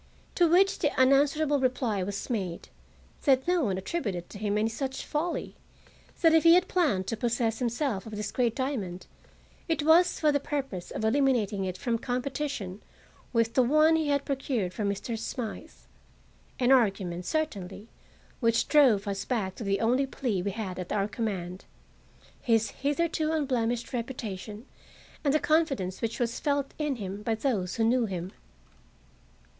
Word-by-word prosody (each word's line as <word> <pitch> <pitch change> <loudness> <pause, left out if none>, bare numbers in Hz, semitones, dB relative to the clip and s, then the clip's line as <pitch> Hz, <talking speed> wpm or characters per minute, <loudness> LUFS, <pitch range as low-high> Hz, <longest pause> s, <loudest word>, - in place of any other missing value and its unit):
To 345 - +4
which 380 +3 +4
the 295 -4 +1
unanswerable 280 +2 +4
reply 250 -6 0
was 200 +2 -4
made 190 -9 -3 0.6
that 265 -1 +3
no 355 -5 +2
one 190 -3 -1
attributed 190 - -3
to 200 - -9
him 210 0 0
any 215 +1 +2
such 265 +4 -4
folly; 325 +4 -3 0.7
that 330 -1 +6
if 325 - +6
he 335 +1 +7
had 365 +1 +3
planned 290 - +1
to 225 - -2
possess 230 -1 -1
himself 240 -3 -1
of 220 - -7
this 210 -1 -4
great 240 -3 0
diamond, 215 -10 -3 0.6
it 320 -3 0
was 340 +3 +5
for 305 -1 +3
the 285 - +1
purpose 270 -11 -4
of 220 - -3
eliminating 220 -6 +2
it 185 -1 -4
from 230 +3 -1
competition 250 -5 -3 0.5
with 230 -1 +1
the 260 - +4
one 305 +6 +4
he 320 -2 0
had 280 -1 +1
procured 255 -9 -2
for 215 - -3
Mr. 200 +3 -2
Smythe; 225 0 -5 0.9
an 250 +1 +3
argument, 195 -8 +2
certainly, 210 - -3 0.5
which 230 -2 +2
drove 245 -9 +4
us 195 -1 -2
back 210 -5 -3
on 210 - -4
the 195 0 +1
only 250 +4 +2
plea 240 -8 -2
we 200 - -2
had 195 -3 -5
at 180 - -6
our 200 -1 +1
command—his 210 +2 -4
hitherto 310 +2 -1
unblemished 245 -6 -1
reputation 225 -3 -5 0.6
and 285 - +3
the 305 - +3
confidence 275 - 0
which 230 0 -2
was 235 -1 -1
felt 285 -1 -1
In 300 -3 0
him 200 -2 -6
by 225 +1 0
those 215 -7 -1
who 230 - +1
knew 235 +1 +3
him. 185 -1 -5
235 Hz, 160 wpm, -28 LUFS, 200-280 Hz, 0.9 s, he